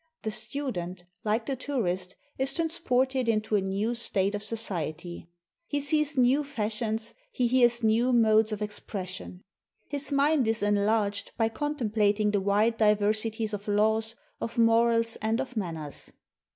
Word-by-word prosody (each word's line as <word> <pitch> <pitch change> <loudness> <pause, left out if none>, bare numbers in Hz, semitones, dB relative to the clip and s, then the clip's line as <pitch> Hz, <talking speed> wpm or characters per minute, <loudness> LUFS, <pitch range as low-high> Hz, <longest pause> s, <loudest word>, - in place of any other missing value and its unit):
The 220 - -2
student, 210 -7 -3 0.2
like 220 +1 0
the 275 - -2
tourist, 190 -10 -2 0.2
is 270 +1 +1
transported 265 -6 +1
into 215 -1 +1
a 200 - +3
new 200 +4 -1
state 200 -4 +1
of 205 - -3
society. 175 -6 -3 0.4
He 290 - -1
sees 290 +1 0
new 260 +4 +4
fashions, 225 -4 -3 0.2
he 250 - 0
hears 240 -1 +3
new 225 +3 +3
modes 220 -2 +4
of 210 0 -3
expression. 185 -3 -6 0.5
His 285 -1 -3
mind 280 -2 +3
is 225 -1 +1
enlarged 205 0 +1
by 225 -1 +2
contemplating 215 -6 0
the 205 -1 +1
wide 210 +4 +2
diver 210 -1 +3
sities 220 0 -2
of 205 0 -5
laws, 220 +2 +2 0.2
of 230 - -5
morals, 230 0 +3
and 220 +2 0
of 260 -1 -4
manners." 160 -8 -4
220 Hz, 145 wpm, -28 LUFS, 205-245 Hz, 0.5 s, new